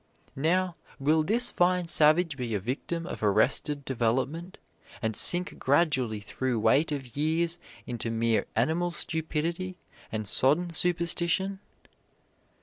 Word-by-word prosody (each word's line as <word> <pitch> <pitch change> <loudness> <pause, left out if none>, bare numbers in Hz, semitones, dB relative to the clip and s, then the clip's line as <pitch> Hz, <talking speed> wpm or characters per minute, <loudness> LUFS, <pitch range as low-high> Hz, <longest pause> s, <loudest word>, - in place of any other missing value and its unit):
Now, 175 +4 0 0.2
will 155 +3 +2
this 235 +9 +2
fine 180 0 +1
savage 160 0 +4
be 120 -4 -3
a - - -1
victim 140 - -4
of - - -7
arrested 110 +7 +1
development, 130 +8 -2 0.4
and 110 -1 -2
sink 180 - +4
gradually 130 -7 +1
through 120 +3 -3
weight 130 +9 +2
of 135 -5 -6
years 165 +3 0 0.3
into 120 -1 -4
mere 115 0 0
animal 160 +10 +1
stupidity 170 +2 -3 0.3
and 110 -1 -4
sodden 155 - +2
superstition? 175 +3 0
155 Hz, 120 wpm, -27 LUFS, 125-175 Hz, 0.4 s, savage